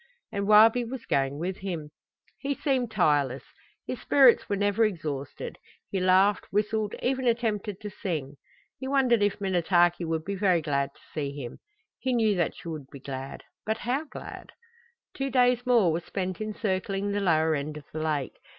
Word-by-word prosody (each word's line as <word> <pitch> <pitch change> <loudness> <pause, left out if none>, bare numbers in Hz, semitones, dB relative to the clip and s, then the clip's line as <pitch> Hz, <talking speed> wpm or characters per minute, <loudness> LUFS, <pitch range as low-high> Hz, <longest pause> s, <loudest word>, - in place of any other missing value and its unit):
And 200 -1 -2
Wabi 220 +3 +7
was 240 +1 -7
going 135 0 0
with 180 +4 -3
him! 170 -6 -5 0.5
He 280 0 -2
seemed 260 -5 0
tireless; 145 - +1 0.4
his - - -5
spirits 265 -4 +5
were 200 - +1
never 205 +2 +2
exhausted; 155 -9 -3 0.3
he 195 - 0
laughed, 185 +2 +3
whistled, 210 +1 0
even 260 0 0
attempted 215 -4 0
to 210 -1 -6
sing. 155 -9 -4 0.4
He 265 - -5
wondered 260 -5 +3
if 205 0 +1
Minnetaki 175 -2 +2
would 160 -1 -2
be 200 - -2
very 185 -3 +3
glad 140 -2 0
to - - -22
see 140 -3 -3
him. 120 -3 -7 0.4
He 260 - -1
knew 220 -3 +3
that 170 -3 0
she - - -11
would 155 -5 -6
be 140 - -9
glad 135 0 -7 0.2
but 220 +1 -1
how 265 +6 -1
glad? - - -10 0.6
Two 275 0 -2
days 250 -1 +3
more 230 -9 +5
were 160 - 0
spent 185 +2 -4
in 215 -1 -3
circling 195 0 -1
the 205 0 -1
lower 160 -4 +3
end 150 +1 -3
of 150 - -11
the 155 - -3
lake. 150 -4 -2
195 Hz, 180 wpm, -27 LUFS, 160-225 Hz, 0.6 s, Wabi